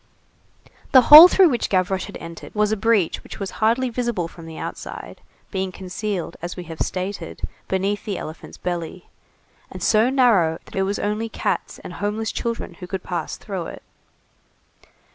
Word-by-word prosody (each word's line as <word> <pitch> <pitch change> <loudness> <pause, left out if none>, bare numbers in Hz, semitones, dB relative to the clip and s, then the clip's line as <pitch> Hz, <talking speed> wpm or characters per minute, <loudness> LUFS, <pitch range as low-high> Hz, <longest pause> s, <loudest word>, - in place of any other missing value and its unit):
The 260 - +9
hole 315 +4 +14
through 370 -1 +5
which 245 -4 -1
Gavroche 185 0 0
had - - -9
entered 165 +4 -10
was 210 0 +2
a - - +2
breach 215 -4 +1
which - - -11
was 195 -2 -4
hardly 235 +4 +3
visible 235 -7 -2
from 165 0 -12
the 160 - -9
outside, - - -7 0.3
being 190 -1 -2
concealed, 185 -1 -5
as 175 +1 -5
we 180 - -5
have 165 -2 -8
stated, 185 +2 -4 0.2
beneath 195 +2 -1
the 200 -3 -3
elephant's 160 +1 -9
belly, 175 0 -5 0.6
and - - -8
so 220 +3 +4
narrow 220 -12 +3
that - - -13
it 195 - +1
was 205 - -1
only 210 +2 -2
cats - - -3
and - - -8
homeless 210 +2 -2
children 230 -5 -4
who 180 - -8
could 190 -1 -5
pass 175 - -4
through 190 -5 -5
it. - - -10
195 Hz, 170 wpm, -22 LUFS, 180-220 Hz, 0.6 s, hole